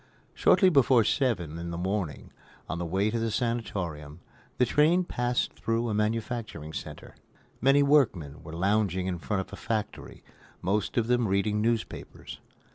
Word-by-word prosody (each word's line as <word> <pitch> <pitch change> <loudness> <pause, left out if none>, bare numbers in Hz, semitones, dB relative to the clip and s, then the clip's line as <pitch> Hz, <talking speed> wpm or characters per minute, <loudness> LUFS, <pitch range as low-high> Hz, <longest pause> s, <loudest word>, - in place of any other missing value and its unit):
Shortly 190 - +5
before 130 -6 +5
seven 90 - 0
in 85 0 -5
the 85 - -4
morning, 95 -2 -3 0.4
on 85 - -4
the 85 - -3
way 95 +5 +1
to 115 - -1
the 115 0 0
sanatorium, 95 - -3 0.4
the 125 - +4
train 155 +8 +3
passed 125 -7 -1
through 115 +1 -1
a - - -1
manufacturing 105 -6 -2
center. - - -8 0.5
Many 135 +2 +5
workmen 95 - +2
were 80 0 -10
lounging 95 0 +1
in 90 -2 -2
front 95 +3 -1
of - - -11
a - - -6
factory, 110 -2 -4 0.4
most 100 +5 -1
of 115 - +3
them 120 -1 +2
reading 105 +2 +1
newspapers. 115 0 -3
105 Hz, 155 wpm, -28 LUFS, 90-120 Hz, 0.5 s, Shortly